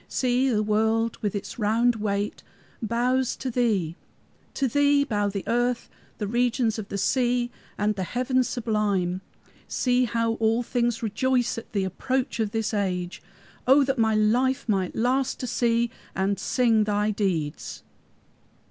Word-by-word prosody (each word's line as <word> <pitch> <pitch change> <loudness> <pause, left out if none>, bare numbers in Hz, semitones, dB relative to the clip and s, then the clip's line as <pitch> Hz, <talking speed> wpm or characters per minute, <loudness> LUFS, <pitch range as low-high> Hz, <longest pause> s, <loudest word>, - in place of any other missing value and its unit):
See, 255 +1 +1
the 215 -3 +1
world 220 +2 +1
with 210 -1 -1
its 205 - -5
round 225 +3 +2
weight 205 -1 -2 0.4
bows 245 +3 +1
to 260 - -4
thee. 210 -10 +1 0.6
To 270 - +1
thee 285 +2 +3
bow 205 -6 0
the 200 -1 -4
earth, 240 +1 0 0.3
the 210 - -2
regions 235 0 +1
of 205 - -7
the 200 - -3
sea 245 +2 +1 0.3
and 210 +1 +1
heaven 250 +7 0
sublime. 210 -7 -1 0.5
See 250 0 +2
how 230 0 0
all 225 +2 +2
things 240 -1 -1
rejoice 245 +2 +1
at - - -15
the 200 -3 0
approach 255 +8 -2
of 220 -2 +1
this 225 0 -2
age! 185 -2 -2 0.5
O 275 +2 +7
that 270 -2 -1
my 220 -1 +3
life 250 +6 +2
might 190 -4 0
last 255 +3 +1
to - - -2
see 235 -1 +1 0.2
and 195 +1 0
sing 230 -4 +2
thy 210 0 +1
deeds!" 175 -8 -2
225 Hz, 150 wpm, -25 LUFS, 205-245 Hz, 0.6 s, O